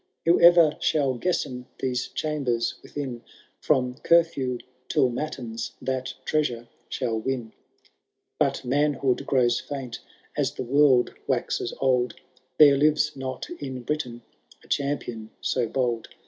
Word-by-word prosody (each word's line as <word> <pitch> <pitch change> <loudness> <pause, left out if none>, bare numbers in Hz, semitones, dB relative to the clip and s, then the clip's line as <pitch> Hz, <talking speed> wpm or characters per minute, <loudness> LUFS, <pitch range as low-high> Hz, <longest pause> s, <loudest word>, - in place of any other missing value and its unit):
' - - -54
Whoever 170 -2 +6
shall 140 -4 +2
guesten 125 -3 -2
these 125 -1 -1
chambers 135 -7 -1
within. 130 -5 -6 0.4
From 130 -4 +1
curfew 155 -7 +3 0.3
till 125 - +3
matins^ 120 -4 -4
that 130 0 -3
treasure 120 -7 0 0.2
shall 115 -4 -1
win. 120 -2 -3 0.9
But - - +1
manhood 140 -1 +1
grows 120 -3 +3
famt 135 -4 -6 0.4
as - - 0
the - - -3
world 130 -1 +4
waxes 120 - -1
old; 125 -3 +2 0.4
There 145 -2 +8
lives 150 +1 +2
not 130 -1 -5
in 130 -3 -5
Britain 120 -4 -3 0.4
a - - -19
champion 130 -6 -2
so 125 -3 0
bold. 120 -2 -1
130 Hz, 120 wpm, -26 LUFS, 120-145 Hz, 0.9 s, There